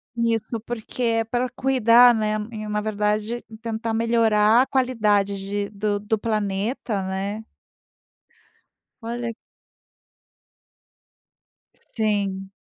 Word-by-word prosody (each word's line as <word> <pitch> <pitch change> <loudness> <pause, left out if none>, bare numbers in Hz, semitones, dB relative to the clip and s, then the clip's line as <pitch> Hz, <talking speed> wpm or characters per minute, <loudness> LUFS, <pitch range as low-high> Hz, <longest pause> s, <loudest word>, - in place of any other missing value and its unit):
nisso, 230 -1 -1
porque 240 +2 -5
é 225 -1 +2
para 245 +3 -1
cuidar, 245 -2 +5
né, 215 -1 0 0.2
e 215 -2 -6
na 210 0 -1
verdade 210 +2 -1 0.2
tentar 225 0 -3
melhorar 225 -1 +4
a - - -6
qualidade 210 -6 +1
de 200 +1 -3
do 205 0 -2
do 215 +2 -1
planeta, 210 0 -2
né. 195 +3 -3 1.6
Olha 235 0 -4 2.4
Sim. 200 -3 -2
220 Hz, 95 wpm, -23 LUFS, 205-235 Hz, 2.4 s, cuidar